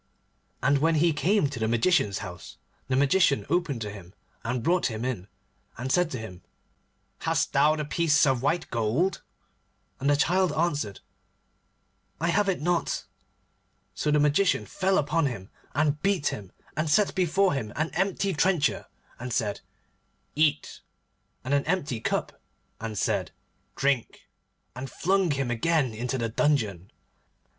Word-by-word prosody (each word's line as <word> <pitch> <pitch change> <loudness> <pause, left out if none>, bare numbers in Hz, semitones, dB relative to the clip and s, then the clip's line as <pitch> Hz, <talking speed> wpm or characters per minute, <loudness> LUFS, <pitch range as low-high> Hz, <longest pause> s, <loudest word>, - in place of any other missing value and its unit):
And 140 +1 +3
when 160 +3 +3
he 165 +1 +3
came 180 +2 +2
to 135 -3 -6
the 110 - 0
Magician's 115 - +2
house, 90 -7 -10 0.3
the 130 - 0
Magician 140 +2 +3
opened 165 -9 0
to 105 -1 -4
him, 95 -2 -12 0.3
and 120 +1 -2
brought 180 +5 +2
him 115 0 -4
in, 115 -8 -3 0.5
and 130 +2 -3
said 180 +1 +3
to 130 - -4
him, 100 -6 -8 0.8
'Hast - - 0
thou 155 +1 +4
the 150 -1 -3
piece 150 0 +3
of 130 -3 +1
white 165 +5 0
gold?' 125 - 0 0.8
And 140 +2 0
the 145 - +5
Star 170 +5 +2
Child - - -4
answered, 145 - -1 1.2
'I 170 - 0
have 205 +3 +2
it 180 -5 -1
not.' 175 0 0 0.9
So 125 +10 -2
the 150 0 +3
Magician 150 +6 +2
fell 190 -1 0
upon 150 +1 +1
him, 110 -6 -6 0.2
and 150 0 +1
beat 195 -7 +1
him, 100 -3 -7 0.2
and 155 0 -1
set 200 +6 +3
before 190 +1 +2
him 115 -7 -3
an 155 +2 -1
empty 195 +2 0
trencher, 165 -1 +1 0.3
and 125 +1 -5
said, 105 -3 -1 0.7
'Eat,' 150 -1 +1 0.6
and 130 +2 -2
an 140 -1 +3
empty 160 -9 -1
cup, - - -2 0.4
and 110 -1 -5
said, - - 0 0.5
'Drink,' 135 -4 -1 0.5
and 130 +1 -6
flung 190 0 +1
him 135 -4 -1
again 135 +1 +1
into 125 +4 -2
the 115 -2 -1
dungeon. 110 - 0
145 Hz, 150 wpm, -27 LUFS, 120-170 Hz, 1.2 s, the